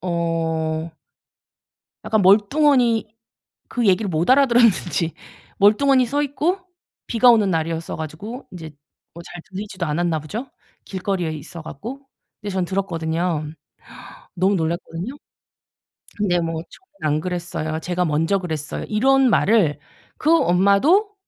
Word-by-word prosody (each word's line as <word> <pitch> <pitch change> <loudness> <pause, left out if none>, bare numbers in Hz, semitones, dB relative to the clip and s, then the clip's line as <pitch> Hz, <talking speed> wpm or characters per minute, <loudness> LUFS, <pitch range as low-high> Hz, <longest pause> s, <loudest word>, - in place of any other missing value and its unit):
어 165 -2 -2 1.1
약간 220 -2 +1
멀뚱하니 230 +4 +4 0.6
그 240 -3 -1
얘기를 200 +2 +3
못 170 +4 0
알아들었는지 235 - +3 0.4
멀뚱하니 255 +6 +4
서 290 +4 0
있고 300 +6 -1 0.5
비가 245 +1 +5
오는 215 -4 +4
날이었어 165 0 -2
가지고 170 - -7
인제 165 -3 -8 0.4
뭐 170 - -9
잘 175 +1 -10
들리지도 190 -2 -5
않았나 160 +1 0
보죠? 215 - -6 0.4
길거리에 185 -3 -2
있어 155 +2 -8
갖고. 215 - -8 0.4
근데 205 -2 -5
저는 185 -1 0
들었거든요. 170 -3 -2 0.9
너무 190 +3 +2
놀랐거든요. 170 +5 -3 1.0
근데 180 -4 +1
뭐 165 -1 -3
"저는 295 - -5
안 155 - 0
그랬어요. 175 -3 -3
쟤가 180 +2 -1
먼저 165 +5 +1
그랬어요." 155 -5 -5
이런 265 +4 +3
말을 195 -8 +3 0.4
그 310 - +1
엄마도 200 - +3
185 Hz, 280 characters per minute, -21 LUFS, 165-230 Hz, 1.1 s, 비가